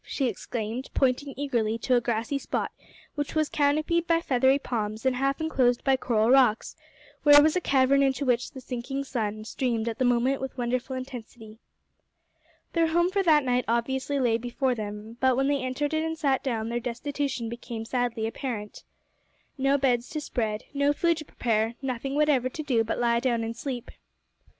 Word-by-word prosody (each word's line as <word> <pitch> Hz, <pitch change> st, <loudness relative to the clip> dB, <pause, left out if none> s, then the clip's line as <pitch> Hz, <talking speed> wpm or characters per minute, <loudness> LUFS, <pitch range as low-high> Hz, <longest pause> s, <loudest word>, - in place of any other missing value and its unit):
she 275 Hz, -, -2 dB
exclaimed, 230 Hz, +2 st, -4 dB
pointing 270 Hz, +1 st, +1 dB
eagerly 235 Hz, -6 st, 0 dB
to 250 Hz, +2 st, +1 dB
a 240 Hz, -, +3 dB
grassy 235 Hz, +4 st, -1 dB
spot -, -, -2 dB, 0.4 s
which 290 Hz, 0 st, -4 dB
was 310 Hz, -1 st, +1 dB
canopied 310 Hz, +4 st, +1 dB
by 335 Hz, -1 st, +3 dB
feathery 265 Hz, -3 st, +3 dB
palms, 220 Hz, -4 st, -4 dB
and 260 Hz, -1 st, +2 dB
half 275 Hz, +3 st, 0 dB
enclosed 260 Hz, -6 st, +1 dB
by 270 Hz, -1 st, +4 dB
coral 230 Hz, -3 st, +1 dB
rocks, 255 Hz, -5 st, +3 dB, 0.5 s
where 290 Hz, -1 st, +8 dB
was 305 Hz, +2 st, +4 dB
a 365 Hz, -, +1 dB
cavern 275 Hz, -2 st, +3 dB
into 275 Hz, +1 st, +1 dB
which 245 Hz, -1 st, +1 dB
the 260 Hz, -, -10 dB
sinking 255 Hz, +2 st, -4 dB
sun 215 Hz, -5 st, -3 dB
streamed 235 Hz, -1 st, -1 dB
at 225 Hz, -, -3 dB
the -, -, +2 dB
moment 245 Hz, +2 st, +2 dB
with 265 Hz, 0 st, -5 dB
wonderful 250 Hz, +2 st, -2 dB
intensity. 240 Hz, -4 st, -9 dB, 1.1 s
Their 330 Hz, -1 st, +3 dB
home 345 Hz, +2 st, +2 dB
for 400 Hz, 0 st, +1 dB
that 310 Hz, -5 st, +4 dB
night 250 Hz, -1 st, +1 dB
obviously 265 Hz, +4 st, 0 dB
lay 235 Hz, -3 st, +2 dB
before 245 Hz, +2 st, -1 dB
them, 215 Hz, 0 st, -7 dB
but 260 Hz, -1 st, +3 dB
when 270 Hz, 0 st, +2 dB
they 285 Hz, -1 st, +1 dB
entered 260 Hz, +4 st, -2 dB
it 315 Hz, 0 st, +1 dB
and 320 Hz, 0 st, -3 dB
sat 275 Hz, -4 st, +1 dB
down, 230 Hz, -4 st, -2 dB
their 240 Hz, +1 st, -1 dB
destitution 255 Hz, +1 st, -3 dB
became 235 Hz, -1 st, -6 dB
sadly 240 Hz, -2 st, -1 dB
apparent. 225 Hz, -2 st, -5 dB, 0.7 s
No 275 Hz, +1 st, +2 dB
beds 250 Hz, -3 st, +1 dB
to 310 Hz, -, -3 dB
spread, 220 Hz, -6 st, -2 dB
no 285 Hz, 0 st, +2 dB
food 335 Hz, +2 st, +1 dB
to 305 Hz, -, -7 dB
prepare, 225 Hz, -3 st, -1 dB
nothing 270 Hz, 0 st, -3 dB
whatever 290 Hz, -4 st, +2 dB
to 310 Hz, +4 st, -6 dB
do 245 Hz, -6 st, +2 dB
but 225 Hz, -, -3 dB
lie 235 Hz, -1 st, +2 dB
down 235 Hz, -2 st, 0 dB
and 225 Hz, +1 st, -4 dB
sleep. 245 Hz, -1 st, -5 dB
255 Hz, 185 wpm, -27 LUFS, 235-280 Hz, 1.1 s, where